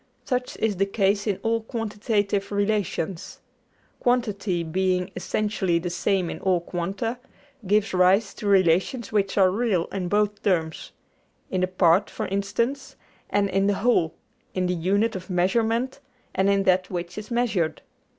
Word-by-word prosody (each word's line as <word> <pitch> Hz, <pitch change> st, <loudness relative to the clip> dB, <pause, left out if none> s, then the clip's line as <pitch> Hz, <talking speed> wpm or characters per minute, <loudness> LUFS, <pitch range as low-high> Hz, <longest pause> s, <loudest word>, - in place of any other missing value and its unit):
Such 250 Hz, -1 st, -2 dB
is 215 Hz, -3 st, 0 dB
the 195 Hz, +1 st, +2 dB
case 200 Hz, +1 st, +1 dB
in 200 Hz, -3 st, +1 dB
all 230 Hz, 0 st, +1 dB
quantitive 210 Hz, -3 st, -1 dB
relations. 200 Hz, -4 st, -2 dB, 0.6 s
Quantity 210 Hz, -8 st, 0 dB
being 180 Hz, +2 st, 0 dB
essentially 190 Hz, -2 st, 0 dB
the 175 Hz, +1 st, -3 dB
same 185 Hz, +1 st, 0 dB
in -, -, -6 dB
all 185 Hz, -2 st, +2 dB
quanta, 195 Hz, +8 st, -3 dB, 0.5 s
gives 210 Hz, +1 st, +2 dB
rise 190 Hz, +3 st, +3 dB
to 210 Hz, -, -6 dB
relations 195 Hz, +5 st, +2 dB
which 200 Hz, -2 st, 0 dB
are 190 Hz, -2 st, +5 dB
real 200 Hz, -5 st, +1 dB
in 190 Hz, -2 st, -3 dB
both 210 Hz, +1 st, +1 dB
terms 165 Hz, -5 st, -1 dB, 0.6 s
in 185 Hz, -, 0 dB
the 185 Hz, -, +2 dB
part, 185 Hz, +1 st, +3 dB
for -, -, -4 dB
instance, 210 Hz, +8 st, -2 dB, 0.3 s
and 205 Hz, -1 st, +2 dB
in 195 Hz, +1 st, +1 dB
the 205 Hz, -, +2 dB
whole, 195 Hz, -9 st, +2 dB, 0.4 s
in 185 Hz, -1 st, +1 dB
the 180 Hz, -, +1 dB
unit 200 Hz, +6 st, +1 dB
of 185 Hz, 0 st, -7 dB
measurement 225 Hz, +8 st, +1 dB, 0.3 s
and 195 Hz, +1 st, +2 dB
in 200 Hz, 0 st, +3 dB
that 185 Hz, -1 st, +2 dB
which 175 Hz, -1 st, -4 dB
is 210 Hz, +1 st, -7 dB
measured. 235 Hz, -9 st, 0 dB
195 Hz, 150 wpm, -25 LUFS, 180-215 Hz, 0.6 s, are